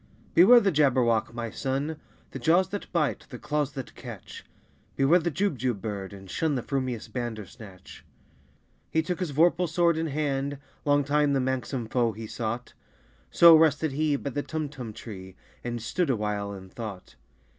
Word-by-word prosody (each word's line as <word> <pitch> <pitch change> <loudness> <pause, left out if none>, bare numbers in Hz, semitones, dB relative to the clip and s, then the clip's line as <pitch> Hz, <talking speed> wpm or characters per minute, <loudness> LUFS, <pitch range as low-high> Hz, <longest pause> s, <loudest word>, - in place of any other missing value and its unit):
"Beware 225 +8 +8
the 200 -4 +2
Jabberwock, 125 -8 +2
my 115 -1 -5
son! 140 +3 -2 0.3
The 135 - -6
jaws 170 +8 +3
that 205 - -6
bite, 160 -5 -1
the 125 - -7
claws 145 +1 -2
that 135 -2 -7
catch! - - -10 0.5
Beware 145 +6 +4
the 170 0 -1
Jubjub 130 - -1
bird, 100 -2 -5
and 95 -1 -11
shun 150 - -1
The 125 - -2
frumious 130 -5 -3
Bandersnatch!" 110 -4 -8 0.9
He 160 - +1
took 180 +1 -3
his 180 -3 -2
vorpal 170 +3 +3
sword 170 0 +2
in 165 0 -1
hand: 140 -1 -1 0.3
Long 145 0 +3
time 145 0 +2
the 135 - +2
manxome 130 -1 -2
foe 115 0 0
he 110 +2 -7
sought 120 +2 -4 0.6
So 170 -1 +8
rested 155 -1 +3
he 150 +1 +1
by 140 0 -4
the 145 - -2
Tumtum 145 -7 -5
tree, 95 -4 -9 0.3
And 120 -1 -3
stood 150 +9 -1
awhile 105 -4 -1
in 95 -1 -9
thought. 100 -8 -8
135 Hz, 165 wpm, -27 LUFS, 115-155 Hz, 0.9 s, Beware